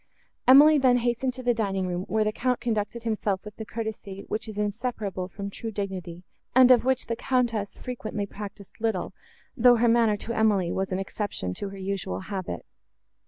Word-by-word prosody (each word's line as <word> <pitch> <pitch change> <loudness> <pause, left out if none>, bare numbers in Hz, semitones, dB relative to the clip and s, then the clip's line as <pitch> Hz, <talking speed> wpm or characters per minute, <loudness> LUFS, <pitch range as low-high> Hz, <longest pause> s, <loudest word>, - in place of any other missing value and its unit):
Emily 290 +4 +8
then 255 -2 +5
hastened 245 +1 0
to 255 - -7
the 245 -1 +3
dining 195 -4 -1
room, 180 +1 -3
where 220 0 +1
the 215 - 0
Count 250 +2 0
conducted 225 0 -2
himself 215 -3 -1
with 210 -1 -9
the 220 - -6
courtesy, 210 -3 -6
which 215 - -3
is 215 -2 -7
inseparable 210 -3 -2
from 200 +2 -7
true 225 - -5
dignity, 185 -4 -5 0.3
and 255 0 +8
of 245 - +6
which 260 0 +1
the 230 - -2
Countess 235 -4 -1
frequently 215 -4 -4
practised 200 0 -10
little, 220 -5 -1 0.4
though 245 -1 +6
her 240 +1 +3
manner 230 -2 +4
to 230 +3 -5
Emily 210 -6 +2
was 190 0 -2
an 185 - 0
exception 195 - -3
to 200 - -5
her 195 - -9
usual 190 - -3
habit. 185 - -5
215 Hz, 185 wpm, -26 LUFS, 195-240 Hz, 0.4 s, Emily